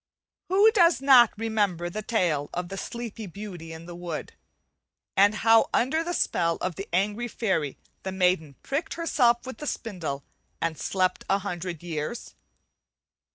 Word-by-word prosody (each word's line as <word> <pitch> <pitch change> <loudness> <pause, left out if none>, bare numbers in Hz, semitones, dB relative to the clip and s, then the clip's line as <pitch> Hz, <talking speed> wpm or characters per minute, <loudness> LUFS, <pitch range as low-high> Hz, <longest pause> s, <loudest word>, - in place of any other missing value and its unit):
Who 405 +4 +6
does 345 -6 +4
not 260 -4 +7
remember 205 -6 0
the 210 +5 -4
tale 175 -10 0
of 175 0 -3
the 195 - -5
"Sleeping 225 0 -6
Beauty 175 -4 -8
in 160 +1 -9
the 175 - -8
Wood," 175 -3 -5 0.8
and 205 +2 +5
how 225 +1 +5
under 315 +7 +2
the 350 +1 -2
spell 165 0 +1
of 185 - -2
the 195 +4 -7
angry 205 +6 0
fairy 190 - -1 0.2
the 190 - -4
maiden 180 -6 +1
pricked 290 +4 -2
herself 250 -8 +2
with 260 -3 -7
the 300 - -5
spindle 165 - -4 0.4
and 160 - -1
slept 185 +3 0
a 195 - +4
hundred 180 -4 -5
years? 165 +6 -4
195 Hz, 155 wpm, -26 LUFS, 175-235 Hz, 0.8 s, not